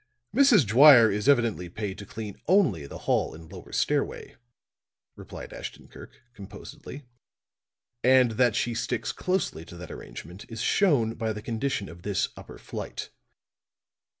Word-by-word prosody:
"Mrs. 245 - +6
Dwyer 120 0 +8
is 105 +5 0
evidently 115 -10 +2
paid 100 +1 -5
to 100 - -9
clean 105 -2 -8
only 145 - +3
the - - -8
hall - - +1
and 80 +1 -13
lower 95 -2 -11
stairway," - - -1 0.8
replied - - -10
Ashton - - -8
Kirk, - - -14
composedly. 115 +7 -10 1.0
"And 130 -1 +5
that 120 0 +2
she 120 - 0
sticks 115 - -2
closely 180 - -2
to 85 - -12
that 85 -1 -9
arrangement 90 +5 -10
is 115 -1 -7
shown 125 - +2
by 110 -1 -3
the 105 - -7
condition 115 -2 -2
of 85 +1 -12
this 100 0 -1
upper - - -11
flight. - - -7
110 Hz, 145 wpm, -27 LUFS, 100-130 Hz, 1.0 s, Dwyer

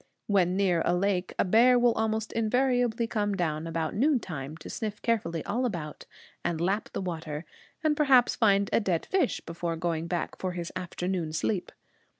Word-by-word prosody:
When 185 -3 +2
near 180 -4 +2
a 175 - +2
lake, 185 0 0
a - - +2
bear 235 +6 +5
will 240 -1 +4
almost 220 0 -1
invariably 245 0 +1
come 205 -3 -1
down 160 -3 -1
about 165 -1 -2
noontime 180 - -1
to 155 - -11
sniff 210 -2 -4
carefully 170 -9 0
all 240 +5 -1
about, 170 -11 -4 0.4
and 165 -2 -1
lap 195 +5 0
the - - -2
water, 160 -3 -4 0.4
and 310 -1 +3
perhaps 265 -5 +4
find 200 -3 +3
a - - +5
dead 185 -6 -1
fish 370 -9 0
before 165 0 -4
going 165 0 -2
back 175 -1 -3
for 185 -1 -2
his 175 -1 -5
afternoon 180 -2 -3
sleep. 180 +3 -1
190 Hz, 170 wpm, -28 LUFS, 170-225 Hz, 0.4 s, bear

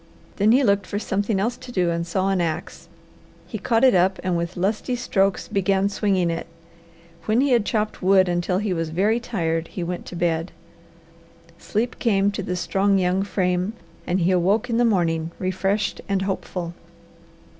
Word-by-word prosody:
Then 210 +2 +4
he 260 +4 +5
looked 200 -4 +2
for 205 - -3
something 205 0 -1
else 235 +5 -1
to 255 -1 -10
do 180 -6 +1
and 170 0 -2
saw 190 +3 0
an 190 -2 +1
ax. 160 -2 -4 0.6
He - - -6
caught 230 0 +1
it 260 - +6
up 185 +1 +3
and 185 -2 0
with 170 +2 -3
lusty 215 +7 -1
strokes 195 -5 0
began 195 0 +1
swinging 195 -4 +1
it. 165 0 -4 0.8
When 220 +2 +2
he 275 +1 +2
had 235 -4 +3
chopped 215 -2 -1
wood 190 0 +4
until 175 +1 0
he 205 -1 -1
was 165 -2 -2
very 205 +8 +1
tired 165 -8 -2
he 180 - -5
went 175 +1 -5
to - - -7
bed. 170 0 -1 1.1
Sleep 235 +4 -2
came 200 -4 +2
to 200 - -4
the 180 -1 -3
strong, 190 +4 +1
young 185 0 +1
frame 185 0 0 0.3
and 180 +1 +1
he 175 +2 +3
awoke 200 +7 +2
in 230 - +1
the 240 - +4
morning 165 -6 +1
refreshed 195 +3 -1
and 195 -1 +1
hopeful. 180 -3 -4
190 Hz, 180 wpm, -23 LUFS, 175-210 Hz, 1.1 s, it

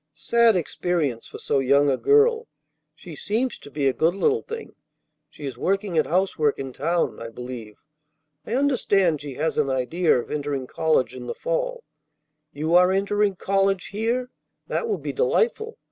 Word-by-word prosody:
Sad 230 +8 +3
experience 165 -7 -1
for - - -9
so 140 - 0
young 140 +2 +3
a - - +2
girl. 450 - +3 0.5
She - - -11
seems 250 - -2
to - - -12
be 145 -1 -1
a 135 - +2
good 165 +6 +1
little 440 - +1
thing. 460 0 -8 0.6
She 150 - -10
is 130 -3 -6
working 195 -1 -1
at 155 - +2
housework 165 -4 +1
in 135 -1 -6
town, 170 +6 -1
I 115 - -6
believe. 120 -3 -8 0.7
I 225 - -3
understand 200 - +2
she 145 -3 -7
has 155 +3 -1
an 145 -2 +1
idea 135 +7 +1
of - - -7
entering 145 -3 -2
college 155 -3 +1
in 125 -1 -8
the - - -4
fall. - - -2 0.7
You 155 +3 -2
are 180 +1 +6
entering 200 +1 +1
college 195 0 0
here? 235 +5 -2 0.3
That 465 - -2
will 425 - 0
be - - -5
delightful. 460 -1 0
175 Hz, 170 wpm, -24 LUFS, 140-235 Hz, 0.7 s, are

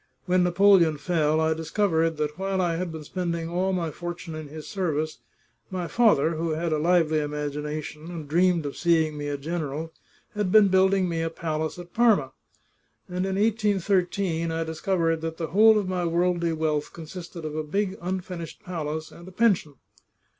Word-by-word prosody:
When 180 0 +3
Napoleon 180 -3 +5
fell, 155 -1 +1
I 160 0 +2
discovered 165 -1 0
that 150 0 -2
while 195 0 -1
I 175 -2 +1
had 180 -1 -3
been 160 -1 -7
spending 170 0 -3
all 180 +3 0
my 170 -4 -1
fortune 175 0 -6
in 155 -1 -6
his 155 +1 -9
service, 155 -5 -2 0.5
my 180 -2 -3
father, 165 -5 +3
who 165 0 -1
had 165 +1 -1
a 155 - +1
lively 160 -1 +3
imagination, 150 +1 -4
and 165 -4 -7
dreamed 170 +1 +2
of 140 - -4
seeing 160 -3 +2
me 145 0 -4
a 145 0 -2
general, 160 +1 -4 0.4
had 210 -3 -1
been 210 -1 +7
building 190 0 +3
me 165 -1 -1
a 165 - -1
palace 160 0 -3
at 175 0 -10
Parma; 220 - +3 0.8
and 180 +1 -2
in 190 - -1
1813 195 -5 +1
I 165 0 -1
discovered 165 0 0
that 160 0 -4
the 165 -2 -3
whole 220 +4 +6
of 205 -3 -1
my 185 -1 -1
worldly 170 0 +1
wealth 155 -2 -1
consisted 170 0 -8
of 155 -1 -4
a 155 - -1
big 195 +5 -1
un 185 +2 -2
finished 175 +1 -8
palace 160 -4 -4
and 170 - -13
a - - -9
pension." 185 -8 +2
170 Hz, 180 wpm, -26 LUFS, 155-185 Hz, 0.8 s, been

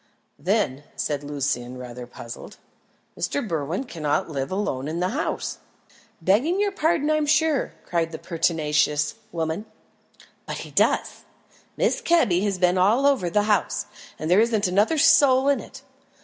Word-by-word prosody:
"Then," 170 -9 0
said 145 -1 -2
Lucian, 130 -4 -3
rather 125 -1 -8
puzzled, 115 -1 -10 0.6
"Mr. 280 -5 -2
Berwin 160 - -2
cannot 160 - -2
live 135 0 -3
alone 165 -9 -2
in 160 +2 -3
the 180 +1 0
house." 295 +10 -3 0.6
"Begging 230 - +2
your 410 -1 +1
pardon, 320 -4 +1
I'm 305 -1 +1
sure," 310 -1 +2
cried 165 -2 -1
the 160 - -5
pertinacious 150 -3 0 0.2
woman, 165 +5 -3 0.8
"but - - -4
he - - -12
does. - - +1 0.6
Mrs. - - +1
Kebby 250 - +3
has 200 -2 0
been 180 0 +2
all 220 +9 +3
over 270 -11 +3
the 205 +4 +2
house, 210 -1 +1 0.3
and 155 - -4
there 190 +4 +6
isn't 225 -3 +1
another 205 - +2
soul 270 -2 +5
in 280 -1 +3
it. - - -11
185 Hz, 150 wpm, -24 LUFS, -, 0.8 s, there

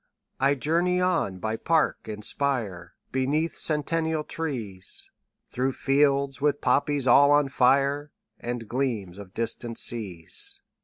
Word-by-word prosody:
20 135 +1 +3
I - - +2
journey 170 +6 +1
on 170 - 0
by 110 +4 -2
park 160 +6 0
and 105 -1 -6
spire, 110 -12 -2 0.2
Beneath 145 +5 0
centennial 160 +1 0
trees, 115 - -4 0.4
Through 130 +2 -1
fields 140 0 +1
with 145 -1 +2
poppies 145 -2 +1
all 140 +3 +7
on 145 -1 +4
fire, 140 +3 +2 0.3
And 120 -2 -5
gleams 110 -7 -2
of 95 -2 -11
distant 115 0 -3
seas. 95 -8 0
135 Hz, 125 wpm, -26 LUFS, 115-145 Hz, 0.4 s, all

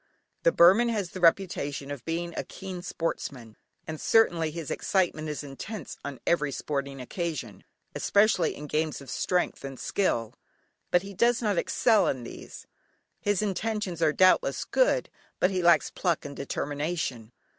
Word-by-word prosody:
The 165 - +4
Burman 195 +9 +6
has 205 -6 -2
the 185 - -7
reputation 165 -6 +1
of 140 -5 -6
being 170 +1 -3
a - - -2
keen 190 -2 -7
sportsman, 140 - -4 0.3
and 155 -1 -6
certainly, 175 -8 +3
his 160 -1 -6
excitement 170 -5 0
is 150 0 -4
intense 150 +6 -7
on 140 -2 -6
every 150 -5 +2
sporting 140 -1 -3
occasion, 130 - -5 0.3
especially 200 -5 +2
in 150 - -8
games 155 +1 -1
of 140 -3 -10
strength 180 -5 0
and 135 -1 -7
skill. 115 - 0 0.6
But 180 +1 +3
he 200 0 -8
does 235 +4 +3
not 205 -5 +2
excel 220 -4 +3
in 130 -3 -1
these. 120 - -10 0.5
His 205 0 +1
intentions 205 -3 -2
are 160 -2 +4
doubtless 185 +4 +3
good, - - +2 0.3
but 180 - +3
he 185 -1 0
lacks 170 -4 +4
pluck 175 -4 -1
and 140 -1 -7
determination. 145 -4 -3
170 Hz, 155 wpm, -28 LUFS, 145-190 Hz, 0.6 s, Burman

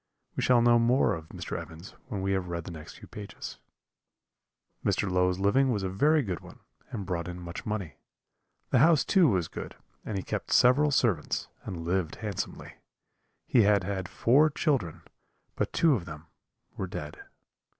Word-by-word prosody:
We - - -1
shall 125 -2 +4
know 120 0 +5
more 120 +3 +3
of 80 -1 -7
Mr. - - -5
Evans 80 +4 -11 0.2
when 100 -7 -4
we 95 - 0
have 95 -2 -1
read 85 -1 -4
the 90 - -8
few 80 - -8
next 75 - -13
pages. 105 -1 -8 1.2
"Mr. - - +1
Low's 90 0 +2
living 115 +8 +3
was 105 -4 -1
a 95 - -1
very 150 +11 +3
good 95 -6 -3
one, - - -14 0.3
and 105 -5 -5
brought 85 -2 -3
in 90 0 -6
much 85 +7 -7
money. 100 -8 -4 0.7
The - - +4
house 160 -4 +5
too 185 -4 +5
was 90 -6 +1
good, - - -7 0.3
and 105 - -4
he 95 - -3
kept - - -4
several 130 +4 +5
servants, 115 - 0 0.2
and 85 -3 -5
lived 90 -2 -1
handsomely. 105 -4 -5 0.7
He 120 - +4
had 100 -2 +4
had 95 -1 -3
four 145 +7 +4
children, 135 - -1 0.5
but - - -1
two 165 -3 +4
of 100 -10 -2
them 80 -1 -9 0.5
were 95 - -3
dead. 75 -4 -7
100 Hz, 175 wpm, -28 LUFS, 90-120 Hz, 1.2 s, know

